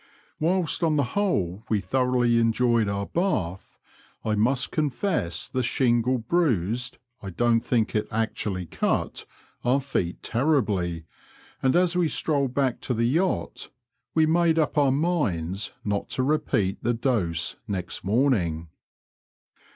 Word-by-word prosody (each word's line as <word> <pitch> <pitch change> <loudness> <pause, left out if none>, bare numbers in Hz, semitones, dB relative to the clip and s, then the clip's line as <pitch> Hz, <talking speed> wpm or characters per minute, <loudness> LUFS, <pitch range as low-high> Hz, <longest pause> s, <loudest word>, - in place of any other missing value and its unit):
Whilst 175 +1 +1
on 160 -2 +3
the 145 - +3
whole 105 - 0
We 110 - +2
thoroughly 120 +3 +2
enjoyed 115 -1 +2
our 100 0 -2
bath, 100 - -2 0.5
I 110 - +1
must 125 +4 +2
confess 150 - -1
the 130 - -2
shingle 125 0 +2
bruised 120 - 0 0.2
(I 100 - -6
don't 115 +5 +2
think 115 -2 0
it 105 - 0
actually 105 -4 -2
cut) - - -2 0.4
our 125 +3 +3
feet 130 -11 -3
terribly, 105 - 0 0.6
and 130 -1 +2
as 180 0 +3
we 175 -2 +2
strolled 140 -5 0
back 135 -3 0
to 125 - -2
the 115 +1 +1
yacht 165 +10 0 0.5
we 160 -1 +5
made 165 0 +3
up 155 -1 +1
our 145 -3 +4
minds 110 - -1
not 100 -1 -2
to 130 - +2
repeat 120 -9 0
the 120 0 +1
dose 100 -10 0
next 90 -3 -4
morning. 95 - +1
120 Hz, 135 wpm, -25 LUFS, 100-145 Hz, 0.6 s, we